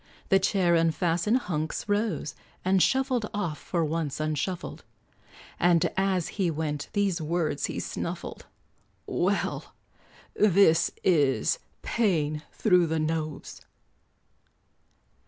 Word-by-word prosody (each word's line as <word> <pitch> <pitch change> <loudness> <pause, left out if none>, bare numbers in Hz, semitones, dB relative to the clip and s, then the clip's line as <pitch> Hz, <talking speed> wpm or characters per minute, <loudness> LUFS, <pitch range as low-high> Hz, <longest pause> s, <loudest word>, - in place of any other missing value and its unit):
The 195 - +5
chair 190 -2 +2
unfastened, 165 +6 +2
Hunks 155 -3 -3
rose, 205 -9 -1 0.3
And 190 0 +3
shuffled 260 -3 +1
off, 170 -7 -2
for 170 -3 -1
once 155 -2 -2
unshuffled; 155 +4 -3 0.8
And 175 0 +3
as 190 -3 +1
he 185 -3 +2
went, 150 -2 -3
these 195 -4 0
words 155 -2 -1
he - - -4
snuffled - - -5 0.6
"Well, 195 +3 -1 0.6
this 195 -5 +4
is 150 - +2 0.2
'paying 155 -10 0
thro' 180 -5 +3
the 160 0 -1
nose.'" 155 -1 -3
170 Hz, 100 wpm, -27 LUFS, 155-195 Hz, 0.8 s, The